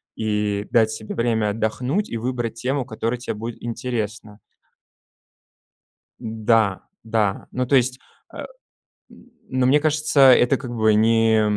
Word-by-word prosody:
и 105 Hz, -2 st, -2 dB
дать 110 Hz, -2 st, +4 dB
себе 110 Hz, -1 st, -6 dB
время 115 Hz, -3 st, 0 dB
отдохнуть 125 Hz, -, -2 dB
и 115 Hz, -, -4 dB
выбрать 120 Hz, -1 st, -3 dB
тему, 130 Hz, +4 st, -2 dB
которая 115 Hz, +1 st, -4 dB
те 120 Hz, -, -5 dB
будет 115 Hz, +2 st, -7 dB
интересна. 110 Hz, -3 st, -5 dB, 1.8 s
Да. 110 Hz, -3 st, 0 dB, 0.2 s
Да, 110 Hz, -3 st, -1 dB
ну 125 Hz, 0 st, -2 dB
то 140 Hz, -, +2 dB
есть, 125 Hz, +1 st, 0 dB, 0.3 s
а, -, -, -11 dB, 0.7 s
м, -, -, -18 dB, 0.2 s
ну 130 Hz, -1 st, 0 dB
мне 145 Hz, +3 st, +4 dB
кажется, 150 Hz, -1 st, +1 dB
это, 125 Hz, +2 st, +3 dB
как 125 Hz, -3 st, -7 dB
бы 110 Hz, -1 st, +3 dB
не 110 Hz, 0 st, +3 dB
115 Hz, 135 wpm, -22 LUFS, 110-125 Hz, 1.8 s, дать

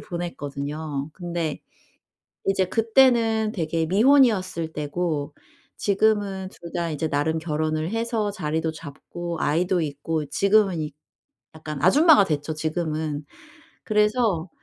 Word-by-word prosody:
보냈거든요. 145 Hz, -3 st, -5 dB
근데 170 Hz, -4 st, -3 dB, 0.9 s
이제 195 Hz, -1 st, +2 dB
그때는 225 Hz, 0 st, +3 dB
되게 165 Hz, -2 st, -1 dB
미혼이었을 195 Hz, -, +3 dB
때고 150 Hz, -1 st, -2 dB, 0.4 s
지금은 200 Hz, -2 st, +1 dB
2 170 Hz, -3 st, -12 dB
다 170 Hz, -2 st, -1 dB
이제 155 Hz, +1 st, -2 dB
나름 150 Hz, +3 st, 0 dB
결혼을 155 Hz, 0 st, -1 dB
해서 225 Hz, -2 st, -1 dB
자리도 160 Hz, -4 st, -2 dB
잡고 165 Hz, +3 st, -7 dB
아이도 175 Hz, +4 st, +1 dB
있고 150 Hz, +1 st, -3 dB
지금은 195 Hz, 0 st, +2 dB
이 150 Hz, 0 st, -4 dB, 0.6 s
약간 155 Hz, -2 st, -6 dB
아줌마가 290 Hz, -, +6 dB
됐죠 150 Hz, -2 st, -2 dB
지금은. 155 Hz, -2 st, -2 dB, 0.6 s
그래서 210 Hz, -5 st, +1 dB
170 Hz, 255 characters per minute, -24 LUFS, 155-205 Hz, 0.9 s, 아줌마가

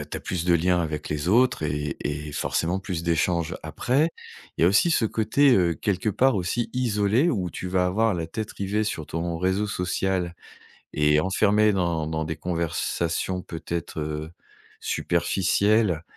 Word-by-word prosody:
as -, -, -6 dB
tu -, -, -6 dB
as -, -, -14 dB
plus 90 Hz, -2 st, -3 dB
de 90 Hz, -1 st, +3 dB
liens 90 Hz, +1 st, +2 dB
avec 75 Hz, -2 st, -4 dB
les 75 Hz, +2 st, -2 dB
autres 120 Hz, -3 st, +3 dB
et 75 Hz, -1 st, -2 dB
et 75 Hz, +1 st, -4 dB
forcément 85 Hz, +5 st, -1 dB
plus 90 Hz, -4 st, -4 dB
d'échanges. 85 Hz, +1 st, 0 dB
Après 130 Hz, -, 0 dB, 0.5 s
il -, -, +1 dB
y -, -, +7 dB
a 85 Hz, -, +6 dB
aussi 105 Hz, -, +4 dB
ce 125 Hz, -, +2 dB
côté, 120 Hz, +7 st, +3 dB
heu, 85 Hz, -3 st, +2 dB
quelque 100 Hz, +3 st, -1 dB
part 130 Hz, +4 st, +3 dB
aussi 95 Hz, +6 st, -1 dB
isolé 115 Hz, -, +2 dB
où 95 Hz, -, -2 dB
tu 90 Hz, -, -6 dB
vas 90 Hz, 0 st, +1 dB
avoir 110 Hz, +3 st, +1 dB
la 85 Hz, -2 st, -3 dB
tête 110 Hz, +4 st, -5 dB
rivée 105 Hz, +2 st, -1 dB
sur 80 Hz, -7 st, -4 dB
ton 85 Hz, 0 st, -3 dB
réseau 95 Hz, +4 st, 0 dB
social 90 Hz, -2 st, -1 dB, 0.6 s
et 75 Hz, 0 st, +3 dB
enfermé 105 Hz, +4 st, +3 dB
dans 85 Hz, -4 st, 0 dB
dans 80 Hz, 0 st, -2 dB
des 80 Hz, +1 st, -3 dB
conversations 85 Hz, +1 st, -2 dB
peut-être, 85 Hz, 0 st, -5 dB
heu, 75 Hz, +1 st, -4 dB, 0.5 s
superficielles 100 Hz, -1 st, +1 dB
90 Hz, 170 wpm, -25 LUFS, 80-105 Hz, 0.6 s, y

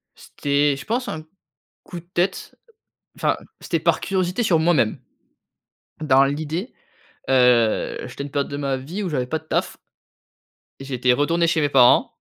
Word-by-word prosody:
C'était, 145 Hz, 0 st, 0 dB
je 135 Hz, -, -10 dB
pense, 245 Hz, +3 st, -2 dB
un 155 Hz, 0 st, -5 dB, 0.6 s
coup 175 Hz, -, -8 dB
de -, -, -24 dB
tête. 180 Hz, +3 st, -1 dB, 0.6 s
Enfin, -, -, 0 dB, 0.2 s
c'était -, -, -1 dB
par -, -, +1 dB
curiosité 190 Hz, +3 st, -1 dB
sur 170 Hz, -6 st, +3 dB
moi-même. 160 Hz, -9 st, +2 dB, 1.0 s
Dans 135 Hz, -3 st, +4 dB
l'idée, 155 Hz, -, -3 dB, 0.6 s
heu, 125 Hz, -4 st, +3 dB
j'étais -, -, -8 dB
à -, -, -5 dB
une 140 Hz, -, -9 dB
période 140 Hz, -1 st, -2 dB
de 140 Hz, -, -4 dB
ma 140 Hz, -2 st, -1 dB
vie 170 Hz, +11 st, -6 dB
où 180 Hz, -, -2 dB
j'avais 130 Hz, -4 st, -2 dB
pas 160 Hz, +4 st, -2 dB
de 160 Hz, -, -25 dB
taf -, -, -2 dB, 1.0 s
et 135 Hz, -, -9 dB
j'étais 125 Hz, -2 st, +1 dB
retourné 165 Hz, +6 st, +1 dB
chez 160 Hz, -1 st, +1 dB
mes 145 Hz, -, +1 dB
parents 125 Hz, -3 st, +5 dB
145 Hz, 165 wpm, -22 LUFS, 135-170 Hz, 1.0 s, parents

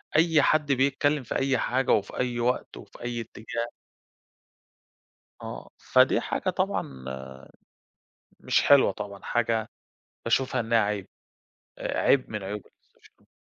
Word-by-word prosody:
أي 160 Hz, -1 st, +5 dB
حد 150 Hz, -1 st, +2 dB
بيتكلم 140 Hz, +2 st, +2 dB
في 115 Hz, -, -5 dB
أي 135 Hz, -1 st, +2 dB
حاجة 130 Hz, +2 st, 0 dB
وفي 100 Hz, -2 st, +1 dB
أي 125 Hz, -1 st, -1 dB
وقت 125 Hz, +2 st, -1 dB
وفي -, -, -13 dB
أي 120 Hz, -1 st, -3 dB
اتجاه. 115 Hz, +1 st, -5 dB, 1.7 s
آه، -, -, -8 dB
فدي -, -, +3 dB
حاجة -, -, -2 dB
طبعًا 65 Hz, -1 st, -2 dB, 1.4 s
مش -, -, +2 dB
حلوة 140 Hz, -7 st, +6 dB
طبعًا 100 Hz, 0 st, -8 dB
حاجة 115 Hz, -2 st, 0 dB, 0.6 s
باشوفها 130 Hz, +2 st, +1 dB
إنها 115 Hz, +1 st, +2 dB
عيب، 105 Hz, -2 st, -1 dB, 0.7 s
عيب 135 Hz, -2 st, +1 dB
من 105 Hz, -2 st, -4 dB
عيوب 105 Hz, +2 st, -4 dB
الsocial -, -, -26 dB
media. -, -, -33 dB
120 Hz, 125 wpm, -27 LUFS, 110-135 Hz, 1.7 s, حلوة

